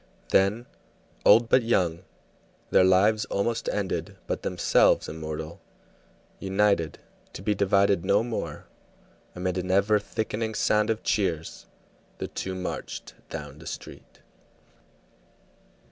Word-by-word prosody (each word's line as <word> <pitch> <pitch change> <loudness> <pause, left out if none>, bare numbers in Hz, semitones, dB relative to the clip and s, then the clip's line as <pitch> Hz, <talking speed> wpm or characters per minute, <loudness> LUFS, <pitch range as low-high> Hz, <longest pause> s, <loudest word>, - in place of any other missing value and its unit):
Then, 100 +5 +3 0.6
old 115 +3 +7
but 130 - +4
young, 90 -8 +1 0.7
their - - +6
lives 100 +4 +4
almost 110 +3 -1
ended, 100 -2 -3
but - - -3
themselves - - +3
immortal, 80 +1 -6 0.8
united, 95 -4 +1 0.4
to 90 - -8
be 105 - +2
divided 100 -2 +2
no 100 - +3
more, 120 -1 -5 0.7
amid 90 0 -2
an 90 0 -4
ever 100 +3 +3
thickening 110 +1 -3
sound 105 0 +2
of 110 -1 -1
cheers, 85 -6 -1 0.5
the - - -4
two 95 0 -5
marched 90 0 -5 0.2
down 75 -2 -7
the 80 - -11
street. - - -9
100 Hz, 115 wpm, -26 LUFS, 90-105 Hz, 0.8 s, old